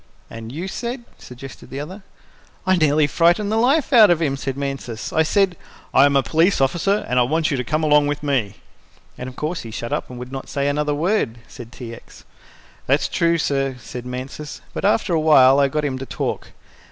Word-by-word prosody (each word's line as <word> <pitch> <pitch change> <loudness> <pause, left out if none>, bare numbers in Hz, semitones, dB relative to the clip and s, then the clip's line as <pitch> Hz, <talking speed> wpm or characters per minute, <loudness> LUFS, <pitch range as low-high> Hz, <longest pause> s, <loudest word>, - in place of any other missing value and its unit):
"And 115 0 -8
you 165 +7 -5
said," 240 +4 -5 0.2
suggested 125 +2 -11
the 135 - -6
other. 185 +8 -7 0.6
"I 185 0 +4
nearly 155 -2 +3
frightened 175 +8 +2
his 220 +1 +2
life 275 +3 +2
out 220 -5 +8
of 175 -2 +3
him," 145 -5 0
said 135 -1 -4
Mansus. 135 -5 -5
"I 160 - +3
said, 185 +3 +2 0.4
'I 135 - +6
am 140 - 0
a 135 - +4
police 165 +7 +2
officer 175 +10 +1
and 125 - +1
I - - +5
want 155 +6 +1
you 140 - 0
to 125 - -2
come 155 +4 -1
along 150 -1 +4
with 145 0 -3
me.'" 125 -9 -1 0.6
"And 125 - -6
of 130 - -13
course 155 +3 -3
he 115 - -9
shut 115 +2 -5
up - - -3
and 125 - -9
would 125 +1 -8
not 135 0 -7
say 140 0 -1
another 150 +1 0
word," 165 - 0
said 120 -2 -11
T. 120 -3 -8
X. - - -14 0.6
"That's - - +2
true, 170 0 +1
sir," 135 -4 -1
said 125 +1 -8
Mansus, 130 +4 -7
"but - - -3
after 205 -2 +2
awhile 145 -4 +5
I 140 - +4
got 150 +2 -2
him 130 -2 -2
to 135 - -5
talk. - - -3
145 Hz, 215 wpm, -21 LUFS, 130-170 Hz, 0.6 s, out